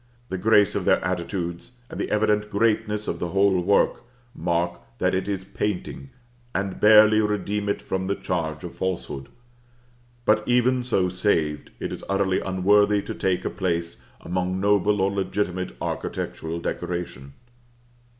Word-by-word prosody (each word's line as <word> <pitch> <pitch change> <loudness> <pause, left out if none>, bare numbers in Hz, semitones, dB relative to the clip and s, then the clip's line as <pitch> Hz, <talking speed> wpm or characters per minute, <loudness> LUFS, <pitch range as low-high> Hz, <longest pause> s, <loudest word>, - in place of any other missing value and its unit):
The 95 - -2
grace 105 0 +4
of - - -1
their - - +4
attitudes, 90 +3 -3
and - - -8
the - - -2
evident 105 0 +1
greatness 105 0 0
of - - -2
the 85 - -2
whole 95 +1 +3
work, 100 +3 +2 0.3
mark 85 0 -1 0.2
that - - +1
it 95 +1 -1
is 100 -2 -2
painting, 105 +7 -4 0.5
and 95 0 -2
barely 110 0 +7
redeem 105 -1 -1
it 100 - -2
from 95 0 -2
the 100 - 0
charge 80 -4 -3
of 90 - -7
falsehood; 85 -7 -4 1.0
but 105 0 +4
even 125 +1 +3
so 100 -7 +1
saved, 90 -5 0
it - - -4
is - - -7
utterly 95 -1 +1
unworthy 100 +2 +3
to - - -5
take 95 -1 -1
a - - +1
place 85 -3 -2 0.2
among 90 +1 -2
noble 100 0 +2
or 95 +1 +2
legitimate 95 -5 -2
architectural 80 +1 -4
decoration. 85 -5 -4
95 Hz, 150 wpm, -24 LUFS, 90-105 Hz, 1.0 s, barely